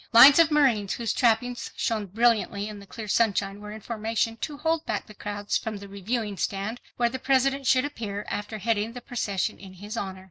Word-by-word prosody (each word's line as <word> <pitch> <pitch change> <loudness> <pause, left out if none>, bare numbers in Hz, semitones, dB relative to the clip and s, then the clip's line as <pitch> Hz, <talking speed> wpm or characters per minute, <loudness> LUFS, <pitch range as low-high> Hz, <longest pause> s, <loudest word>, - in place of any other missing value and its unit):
Lines 275 +6 +10
of 330 -2 +6
marines 255 -10 +3
whose 230 -2 -1
trappings 240 0 +1
shone 215 -3 -1
brilliantly 215 -1 +1
in 210 -1 -7
the 200 - -13
clear 220 +1 -7
sunshine 205 -2 +1
were 210 0 -8
in 215 0 -8
formation 225 +1 -1
to 290 +4 -5
hold 320 +1 0
back 210 -2 -2
the 215 - -13
crowds 205 0 -2
from 220 -2 -5
the 200 0 -9
Reviewing 205 +1 -3
stand 200 +6 -2 0.2
where 240 - +3
the 260 +2 -5
President 270 +1 +2
should 255 +1 +4
appear 210 -7 -5
after 210 +2 -4
heading 220 +1 0
the 245 - -8
procession 220 -6 -2
in 190 -1 -11
his 205 +4 -8
honor. 190 -4 -4
220 Hz, 205 wpm, -26 LUFS, 205-245 Hz, 0.2 s, Lines